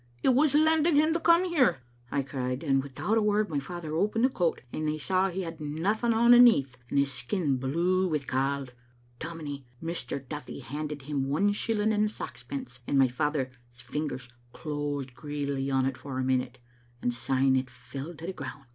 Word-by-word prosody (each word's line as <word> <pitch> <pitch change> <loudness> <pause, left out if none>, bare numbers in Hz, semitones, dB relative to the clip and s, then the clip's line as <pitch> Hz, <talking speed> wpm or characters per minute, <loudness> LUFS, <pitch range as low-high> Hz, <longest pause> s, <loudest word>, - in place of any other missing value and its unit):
*It - - +4
was 275 +3 +4
lended 315 +1 +4
him 310 +2 +4
to 335 - 0
come 335 +2 +5
here, 270 - +2
' 120 - -33
I 140 - +1
cried, 130 0 -3
and 135 -3 +3
without 160 +11 -1
a - - +1
word 210 -2 +2
my 145 - 0
father 160 +2 -6
opened 210 +8 +2
the - - +4
coat, 175 -10 0
and 155 0 -2
they 155 0 0
saw 185 +5 +1
he 190 +1 -3
had 165 -2 -7
nothing 190 +11 0
on 235 +2 +6
aneath, 225 - +6
and - - -1
his 140 0 +3
skin 135 +3 -1
blue 170 +8 +1
wi 150 -5 -1
'cauld. 135 0 -1 0.5
Dom 165 0 -6
inie, 140 -3 -6
Mr. 165 -5 -4
Duthie 150 -1 -6
handed 150 +2 -5
him 140 -1 -2
one 195 +9 +2
shilling 215 +1 0
and 210 0 +2
saxpence, 125 - -7
and 140 - +1
my 135 -1 +5
father's 145 +1 -1 0.2
fingers 125 +1 -4 0.3
closed 145 -3 -3
greedily 140 0 -3
on't 135 -1 +1
for 135 -2 -6
a 130 - 0
minute, 130 -1 0 0.4
and 120 - 0
syne 130 +2 +2
it 130 -1 0
fell 135 +6 -8
to 160 - -9
the 190 - -3
ground. 140 -5 -8
150 Hz, 190 wpm, -28 LUFS, 135-195 Hz, 0.5 s, on